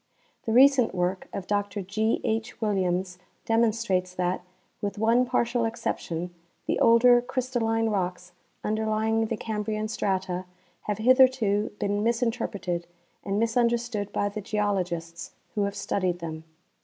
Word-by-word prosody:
The - - +1
recent 255 -3 +5
work 180 +1 -1
of 195 - -5
Dr 205 0 -1
G. 215 +4 0
H. 225 +2 -2
Williams 185 -4 -1 0.3
demonstrates 220 -5 +1
that, 180 0 -1 0.4
with 205 0 -3
one 230 +4 +3
partial 240 -1 +1
exception, 180 -7 -3 0.3
the - - 0
older 240 +1 +6
crystalline 240 -3 -1
rocks 180 -3 -2 0.3
underlying 220 +1 0
the 225 - -2
Cambrian 215 0 -3
strata 190 -3 -2 0.4
have 210 -2 -1
hitherto 245 -3 +4
been 205 0 0
misinterpreted 225 -6 -1 0.4
and 200 +1 -1
misun 230 +1 +3
derstood 235 -4 -2
by 205 - 0
the 205 +1 -5
geologists 180 -5 -2 0.2
who 205 -2 +1
have 200 0 -3
studied 185 -3 -1
them. 160 -2 -7
210 Hz, 130 wpm, -26 LUFS, 190-230 Hz, 0.4 s, older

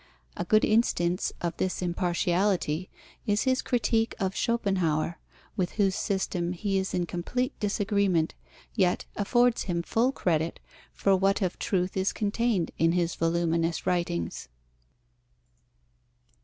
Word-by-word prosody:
A - - -3
good 215 +4 +4
instance 180 -5 +1
of 170 -1 -2
this 185 - -1
impartiality 175 -1 0 0.4
is 205 0 +2
his 260 -1 +2
critique 225 -1 +1
of 190 0 -1
Schopenhauer, 180 -8 0 0.4
with 185 -4 -1
whose 195 -3 +2
system 185 -4 -1
he 195 +2 0
is 190 - -2
in 180 -1 0
complete 210 +10 -2
disagreement, 200 -5 +1 0.4
yet 185 -5 +1
affords 240 +3 +2
him 170 -2 -1
full 235 +8 +2
credit 165 - -1 0.3
for 195 -1 +2
what 195 +2 +2
of 180 - -2
truth 185 -4 -1
is 190 0 +1
contained 210 -3 0
in 165 +1 +4
his 175 -1 +1
voluminous 165 0 0
writings. 85 - -1
185 Hz, 125 wpm, -28 LUFS, 170-205 Hz, 0.4 s, good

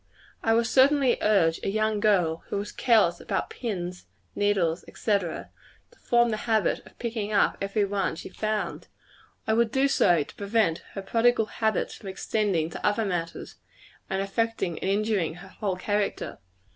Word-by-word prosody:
I 225 0 +3
would 230 0 +3
certainly 265 +1 +4
urge 180 -6 +3
a - - -2
young 215 +1 0
girl 185 -7 +2
who - - -3
was 205 +1 -4
careless 220 -8 +3
about - - -3
pins, 180 - -5 0.3
needles, 190 -5 +1
&c., 220 - -3
to 170 -4 -6 0.5
form 240 0 +3
the 215 - -1
habit 220 -2 +2
of - - -19
picking 225 -3 -3
up 205 - +3
every 200 +1 +1
one 195 -4 -1
she - - -8
found. 215 +2 -3 0.6
I 220 - +1
would 230 0 +2
do 270 +2 +3
so, 175 - +3
to - - -14
prevent 200 -5 +1
her 195 - -5
prodigal 230 +2 +3
habits 220 0 -1
from 195 - -9
extending 190 -4 -1
to - - -8
other 210 +1 +2
matters, 170 -3 -4 0.5
and 195 0 0
affecting 200 -4 -1
and - - -2
injuring 200 -5 0
her 185 +2 -12
whole 195 -1 -3
character. 205 +2 -2
205 Hz, 165 wpm, -26 LUFS, 185-225 Hz, 0.6 s, certainly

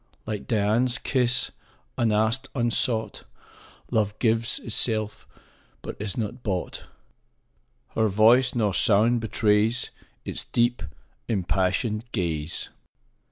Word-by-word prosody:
Like 110 -2 -5
Dian's 115 +3 +2
kiss, 125 -1 +1 0.4
unasked, 110 +3 +1
unsought, 120 -2 0 0.7
Love 105 -1 0
gives 115 0 +1
itself, 110 -2 -1 0.6
but - - -6
is 100 -2 -4
not 120 +2 -3
bought; 95 -6 -3 1.1
15 - - -32
Nor 110 -1 +3
voice, 115 +6 +4
nor 105 -4 +1
sound 115 +5 +3
betrays 110 +1 +2 0.3
Its - - -3
deep, 120 +1 +1 0.5
impassioned 105 +2 0
ga/e. 80 -7 -1
110 Hz, 100 wpm, -25 LUFS, 105-120 Hz, 1.1 s, voice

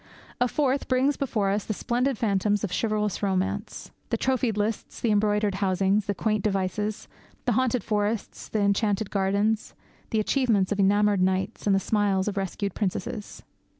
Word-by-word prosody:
A 245 - +3
fourth 275 +1 0
brings 265 +3 +2
before 215 -8 0
us 205 0 0
the 215 - -3
splendid 245 +3 0
phantoms 205 -1 +1
of 200 - -2
chivalrous 210 -3 0
romance 190 -2 -2 0.2
the - - 0
trophied 255 -4 0
lists, 210 +1 -2
the 230 - +1
embroidered 210 0 +2
housings, 195 +1 +2
the 205 - -1
quaint 215 +1 0
devices, 205 +1 -1 0.4
the 250 - +2
haunted 250 0 +1
forests, 210 0 -2
the 215 - 0
enchanted 200 0 +1
gardens, 200 +2 0 0.3
the 220 - +1
achievements 215 -4 +2
of 205 - -1
enamoured 205 0 +3
knights, 190 +4 0
and 195 - +4
the - - +3
smiles 200 -1 +1
of 210 - -1
rescued 195 0 -2
princesses.' 210 +2 -4
210 Hz, 160 wpm, -26 LUFS, 195-225 Hz, 0.4 s, and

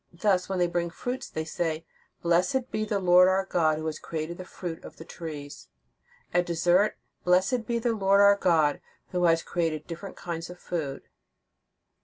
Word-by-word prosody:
Thus, 185 +1 +1
when 190 - -1
they 175 - +3
bring 170 0 -1
fruits 245 +9 -5
they 160 0 -4
say: 160 -1 -2 0.4
"Blessed 185 +10 +1
be 215 - -1
the 210 -1 0
Lord 180 -1 +6
our 190 +1 +2
God, 160 -5 +2
who 155 - -5
has 155 -1 -3
created 165 +2 -5
the 185 - -6
fruit 175 -2 -7
of - - -11
he 165 - -10
trees." 150 -5 -8 0.7
At 175 0 +2
dessert: 175 +4 +2 0.3
"Blessed 190 +6 +2
be 235 - 0
the 235 0 0
Lord 200 -2 +3
our 200 0 +7
God, 165 -7 +2 0.3
who 180 -1 +1
has 165 -1 +3
created 160 -3 -2
different 175 +4 -7
kinds 170 -1 -5
of 180 - -9
food." 150 -7 -4
175 Hz, 180 wpm, -27 LUFS, 165-195 Hz, 0.7 s, our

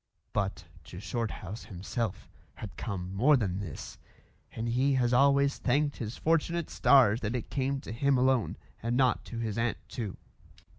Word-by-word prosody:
But 100 -4 -2 0.2
to 90 - -9
Shorthouse 110 -1 -4
himself 100 +2 -4 0.3
had 95 -7 -8
come 95 -3 -4
more 135 +9 +5
than 95 -5 -1
this, 85 -8 -7 0.5
and 115 +1 -4
he 130 +4 +2
has 125 -1 +2
always 140 +2 +4
thanked 145 +3 +1
his 115 0 -5
fortunate 165 +1 0
stars 120 -5 +5
that 115 +2 -2
it 120 - -4
came 135 0 0
to - - -8
him 135 +4 +2
alone 130 -3 +2 0.2
and 120 +2 0
not 130 -2 +3
to 115 - -7
his 115 -2 -2
aunt 115 0 0
too. 110 -6 -5
120 Hz, 160 wpm, -30 LUFS, 105-135 Hz, 0.5 s, more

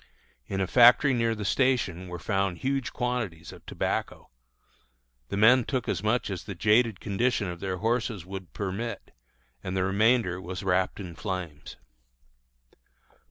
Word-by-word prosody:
In 95 - -3
a - - +2
factory 125 +6 +6
near 115 -2 +1
the 105 -1 -5
station 100 -8 +1
were 90 0 -6
found 95 0 -1
huge 135 +2 -2
quantities 120 -10 -3
of - - -14
tobacco. - - -3 1.0
The - - -3
men 120 +4 +6
took 130 +1 -2
as 90 - -1
much 110 0 0
as 90 -3 -5
the 100 - -6
jaded 110 +2 +3
condition 105 0 0
of 85 -1 -6
their 95 0 -3
horses 110 -3 -1
would 95 -1 -8
permit, 100 +3 -5 0.5
and 95 0 -3
the 95 - +1
remainder 100 -1 +2
was 90 +1 -6
wrapped 95 +1 0
in 90 -4 -7
flames. 90 -6 -6
100 Hz, 150 wpm, -27 LUFS, 90-120 Hz, 1.0 s, factory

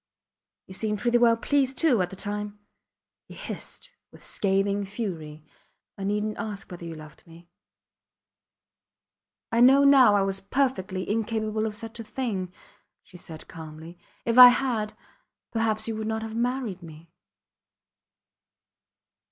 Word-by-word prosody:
You 190 - -11
seemed 210 +2 -1
pretty 240 +2 +2
well 230 -1 +5
pleased, 270 +1 0
too 270 - +3
at 180 - -1
the 190 - -9
time, 210 +1 -5 0.7
he - - -12
hissed, - - -8 0.2
with - - -16
scathing 200 0 0
fury. 170 -8 -6 0.5
I - - -10
neednt 210 +1 -1
ask 205 -4 -6
whether 175 -1 -8
you 165 -1 -6
loved 155 -1 -13
me. 170 +1 -16 2.0
I 230 - +2
know 270 +3 +7
now 270 -6 +7
I 200 - +3
was 195 0 -1
perfectly 195 -4 -1
incapable 220 0 -1
of 210 - -5
such 225 +1 -7
a - - -5
thing, 210 -6 -3 0.5
she 180 - -15
said, 160 -2 -10
calmly, 160 +2 -10 0.3
If 235 +2 +3
I 250 - +14
had, 230 -4 0 0.5
perhaps 220 -1 0
you 225 - -2
would 220 0 -3
not 220 0 -2
have 220 0 -6
married 240 -5 -2
me. 165 0 -13
210 Hz, 140 wpm, -26 LUFS, 185-230 Hz, 2.0 s, I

